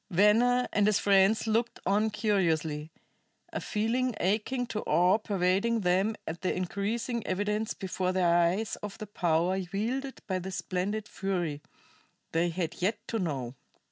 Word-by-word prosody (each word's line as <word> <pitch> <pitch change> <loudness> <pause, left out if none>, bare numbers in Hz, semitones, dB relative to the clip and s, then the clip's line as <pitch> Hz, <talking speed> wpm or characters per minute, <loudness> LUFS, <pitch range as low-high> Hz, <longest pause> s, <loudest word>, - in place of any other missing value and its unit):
Venner 225 +6 +4
and 205 0 +3
his 210 -2 +4
friends 200 +2 +4
looked 225 +2 0
on 210 +3 +2
curiously, 165 -8 0 0.6
a - - -2
feeling 235 +3 0
akin 220 +6 0
to 225 -2 -4
awe 180 +6 +4
pervading 200 +3 +1
them 190 +4 +2
at 165 +1 -5
the 185 - 0
increasing 215 +6 -2
evidence 210 +3 -1
before 185 -1 -2
their 180 -2 +3
eyes 175 +6 +1
of 205 -1 -7
the 215 - -6
power 180 -1 +1
wielded 260 +7 -2
by 185 -1 -1
this 185 +1 -5
splendid 200 +4 -2
fury, 175 -8 -2 0.7
they 170 +2 +1
had 170 -1 -4
yet 205 +4 +1
to 225 - -1
know. 135 - -2
195 Hz, 145 wpm, -29 LUFS, 180-220 Hz, 0.7 s, Venner